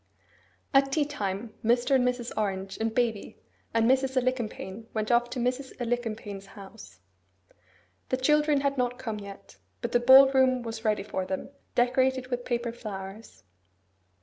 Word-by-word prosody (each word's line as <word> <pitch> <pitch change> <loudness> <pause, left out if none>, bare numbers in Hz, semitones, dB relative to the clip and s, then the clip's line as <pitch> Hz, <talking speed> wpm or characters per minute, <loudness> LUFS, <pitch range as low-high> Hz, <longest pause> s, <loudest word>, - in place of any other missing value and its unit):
At 275 0 +4
tea 295 +1 +2
time, 215 -6 -4
Mr. 240 +4 +2
and 260 -2 +4
Mrs. 250 -1 -1
Orange, 195 -2 -2
and 225 0 0
baby, 225 -3 -1 0.3
and 230 0 +2
Mrs. 265 +1 +2
Alicumpaine 230 -4 -2
went 215 +1 -1
off 240 0 +3
to 250 - -4
Mrs. 255 +3 -2
Alicumpaine's 225 -5 -3
house. 190 - -13 1.1
The 255 - +1
children 300 +2 +3
had 275 -1 0
not 245 0 0
come 225 -5 -4
yet; 200 -1 -11 0.2
but - - -4
the 240 - +3
ball 265 +2 +8
room 260 -2 +3
was 225 -1 -6
ready 210 -3 +1
for 190 -2 -3
them, 190 - -4 0.3
decorated 255 +1 +2
with 245 0 -2
paper 235 -1 -1
flowers. 210 -2 -9
240 Hz, 150 wpm, -28 LUFS, 215-260 Hz, 1.1 s, ball